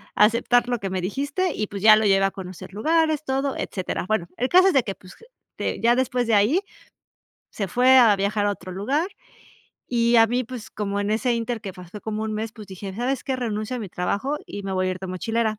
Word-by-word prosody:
aceptar 235 +3 +3
lo 245 -2 -1
que 195 - -4
me 185 -1 -2
dijiste" 285 - -1
y 210 - -2
pues 200 -1 -7
ya 215 0 +9
lo 215 0 +1
llevé 195 -1 +4
a 195 - 0
conocer 185 0 -9
lugares, 315 +6 +1
todo, 270 0 -1
etcétera. 185 -2 -3
Bueno, 205 -5 0
el 255 +2 0
caso 370 +2 +6
es - - 0
de 265 - +4
que, 195 -3 -5
pues 185 0 -15
j - - -18 0.3
te - - -2
ya 235 +1 +4
después 250 -1 0
de 225 - +3
ahí, 240 - +3 0.9
se 200 -3 -3
fue 255 +6 +5
a 225 -5 +7
viajar 205 +1 0
a - - +2
otro 185 -2 -8
lugar, 270 - 0 0.8
y 235 -1 +2
a 225 - +7
mí, 245 +3 -1
pues, 240 -2 -8
como 200 -1 -3
en 205 +1 -1
ese 235 +3 +1
ínter, 230 0 -3
que 195 -3 -6
fa 180 - -10
pasó 185 +4 -10
como 215 0 -4
un 220 - -3
mes. 215 +1 -4
Pues 215 -3 -11
dije: 190 0 -7
¿Sabes 250 +5 -2
qué?, 265 -2 -1
renuncio 220 0 -3
a - - -4
mi 205 - -6
trabajo 205 +12 -2
y 205 - -7
me 195 0 -4
voy 185 0 0
a - - 0
ir 185 - -7
de 190 - -5
mochilera". 220 +4 -1
220 Hz, 245 wpm, -23 LUFS, 200-250 Hz, 0.9 s, ya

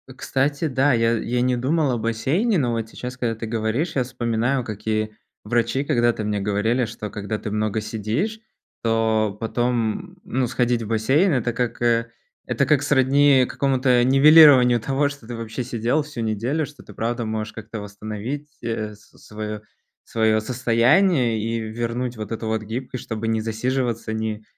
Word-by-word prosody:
Кстати, 140 +4 -1
да, 135 0 +2
я 115 0 +2
я 120 +1 -1
не 125 0 +2
думал 140 +3 +1
о 120 - 0
бассейне, 140 - 0
но 125 -5 +1
вот 115 -1 -3
сейчас, 125 +2 -7
когда 115 -2 -1
ты 115 - -6
говоришь, 115 +9 -1
я 130 - +2
вспоминаю, 120 +1 -1
какие 110 0 -3 0.3
врачи 120 +5 0
когда-то 120 -6 +1
мне 105 -1 -1
говорили, 110 +5 +1
что 110 -1 -6
когда 105 +1 -4
ты 105 - -6
много 110 0 -1
сидишь, 115 - -2 0.4
то 110 -2 +1
потом, 120 - -1
ну, 130 -1 -1
сходить 120 -1 0
в - - -6
бассейн. 135 - +2
Это 120 -2 0
как, 120 0 -2
э 115 -1 +2 0.4
это - - +1
как 145 -2 +3
сродни 140 -1 +4
какому-то 130 -3 +2
нивелированию 135 -2 +7
того, 135 +5 0
что 140 -6 -11
ты 120 - -5
вообще 115 +2 -5
сидел 120 +4 0
всю 145 -5 -6
неделю, 115 +8 -1
что 145 0 -14
ты 105 - -14
правда 120 +1 -2
можешь 110 0 -3
как-то 110 0 -7
восстановить, 110 +7 -6 0.2
э, 110 -2 -3
с 105 - -23
свое 105 0 -6 0.4
свое 110 -1 +1
состояние 125 - +2
и 115 +2 -2
вернуть 120 +2 -3
вот 110 +1 -6
эту 115 0 -4
вот 110 0 -1
гибкость, 125 +3 -5
чтобы 110 0 -4
не 110 -1 0
засиживаться, 115 +1 -2
не 110 -1 -3
115 Hz, 165 wpm, -22 LUFS, 110-130 Hz, 0.4 s, нивелированию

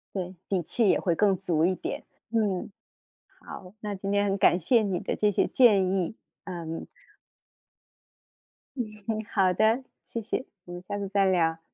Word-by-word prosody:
对， 185 -1 -4
底 190 -3 0
气 220 +6 +1
也 - - +4
会 175 -4 +1
更 200 +1 +3
足 170 -3 +1
一 185 - +3
点， - - -5 0.3
嗯， 210 -4 0 0.7
好， 180 0 -10
那 210 -2 -4
今 195 +1 -4
天 205 0 +2
很 195 -1 +1
感 180 - +4
谢 225 +7 +3
你 190 -4 -1
的 200 - -3
这 210 - +2
些 200 - +2
建 205 -7 +5
议， 190 +2 -1 0.3
嗯。 165 -3 -5 1.9
嗯， 245 - 0 0.5
好 190 -3 +3
的， 220 +7 +3 0.2
谢 230 - -5
谢， 255 - -3 0.2
我 175 - -9
们 175 - -7
下 205 0 -3
次 200 -1 -3
再 200 0 +2
聊。 165 -3 +2
195 Hz, 180 characters per minute, -27 LUFS, 180-210 Hz, 1.9 s, 建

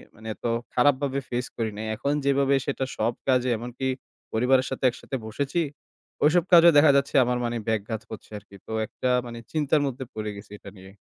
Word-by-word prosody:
মানে, 110 0 -11
এত - - -13 0.3
খারাপভাবে 140 +1 +2
face 125 +1 -2
করি 115 -1 -1
নাই। 110 0 -4
এখন 140 +6 -1
যেভাবে 140 0 +3
সেটা 135 -1 -1
সব 120 - +1
কাজে, 130 -1 +3
এমনকি 125 +3 -4 0.5
পরিবারের 130 +3 +3
সাথে 130 - -5
একসাথে 130 +2 -7
বসেছি, 140 +9 -1 0.6
ওইসব 160 +3 +4
কাজেও 170 -1 +8
দেখা 145 0 +7
যাচ্ছে, 140 0 -1
আমার, 125 0 0
মানে, 120 0 -2
ব্যাঘাত 110 0 -2
করছে 110 - -9
আর - - -25
কি। 100 - -14
তো - - -8 0.2
একটা, 130 - -3 0.2
মানে, 120 -1 -7
চিন্তার 150 -1 +2
মধ্যে 130 0 -4
পড়ে 110 -1 -4
গেছি 100 0 -12
এটা - - -10
নিয়ে। 95 +1 -13
130 Hz, 190 wpm, -25 LUFS, 110-140 Hz, 0.6 s, কাজেও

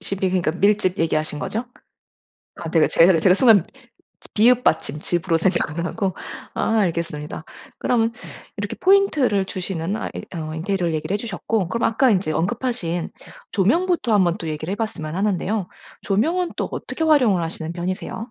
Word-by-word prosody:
짚이 195 -1 -2
그니까 180 -4 +1
밀짚 195 +1 +1
얘기하신 155 -2 0
거죠? 225 +10 -3 0.9
아 165 - -6
내가 160 - +4
제가 170 +3 +5
를 165 -3 +2
제가 185 0 +5
순간 215 -7 +5 0.7
비읍 245 +3 +4
받침 150 - +1
즙으로 170 +1 0
생각을 170 -2 0
하고. 195 -2 -2 0.4
아 225 - 0
알겠습니다. 165 -4 -3 0.3
그럼 230 -2 +1 0.5
이렇게 205 0 -4
포인트를 305 - +3
주시는 185 0 -3
아 - - -4
이 - - -6
어 155 -1 -5
인테리어를 175 0 -1
얘기를 155 +5 -2
해 - - +2
주셨고 210 -2 -2
그럼 230 +4 -2
아까 260 +3 +3
인제 185 -5 +1
언급하신 175 -1 -2 0.4
조명부터 245 - +1
한번 185 -3 +3
또 165 - -6
얘기를 155 +3 -4
해 200 - -1
봤으면 170 -9 -4
하는데요. 195 0 -1 0.3
조명은 330 - 0
또 - - -2
어떻게 325 - -4
활용을 250 - +4
하시는 160 0 -5
편이세요? 185 +2 -4
190 Hz, 370 characters per minute, -22 LUFS, 165-225 Hz, 0.9 s, 제가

